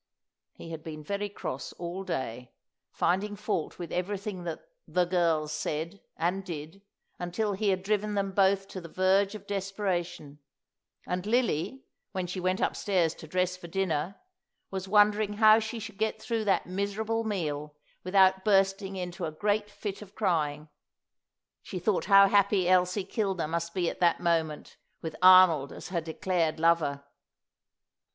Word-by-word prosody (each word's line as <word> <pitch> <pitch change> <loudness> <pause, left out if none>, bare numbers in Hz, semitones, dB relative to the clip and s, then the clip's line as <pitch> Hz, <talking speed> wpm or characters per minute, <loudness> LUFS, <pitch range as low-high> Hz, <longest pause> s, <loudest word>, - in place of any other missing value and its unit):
He 165 - -10
had 160 -1 -7
been 155 -1 -7
very 200 +5 -3
cross 130 -9 -6
all 175 +2 -5
day, 125 -8 -4 0.4
finding 195 +4 0
fault 205 -5 -3
with 170 -3 -7
everything 185 0 -3
that 165 -2 -5 0.2
"the 180 -1 +2
girls" 165 -4 +1
said 165 +7 -3 0.2
and 180 +4 0
did, 165 +1 -7 0.4
until 200 +4 -1
he 200 +1 0
had 185 -1 0
driven 210 +1 0
them 195 -1 0
both 195 0 +2
to 185 - -7
the 170 - -10
verge 195 +3 +2
of 205 -2 -9
desperation; 185 -6 -3 0.7
and 180 +2 -3
Lily, 240 - 0 0.3
when 185 -2 -2
she 180 +1 -5
went 185 +1 0
upstairs 180 -6 +1
to 160 - -12
dress 180 +2 0
for 180 -1 -10
dinner, 175 0 -1 0.6
was 190 0 -4
wondering 210 +1 +4
how 215 +1 +6
she 220 +1 -4
should 215 -2 -8
get 220 0 0
through 225 -1 -2
that 195 - +2
miserable 205 +4 -2
meal 150 -8 -3 0.3
without 190 0 +4
bursting 195 -1 +2
into 180 -2 -4
a 155 - -3
great 205 +5 0
fit 205 -1 -6
of 210 -1 -12
crying. 155 -7 0 0.9
She 190 - -7
thought 185 +2 0
how 195 0 +7
happy 200 -2 +3
Elsie 185 +1 +3
Kilner 190 -5 -1
must 170 +2 -3
be 180 -2 +1
at - - -3
that 175 -2 +3
moment 165 -3 -1 0.3
with 160 -1 -4
Arnold 185 -6 +7
as - - -9
her 175 -2 -1
declared 165 -1 -1
lover. 160 -4 +2
185 Hz, 155 wpm, -29 LUFS, 170-200 Hz, 0.9 s, how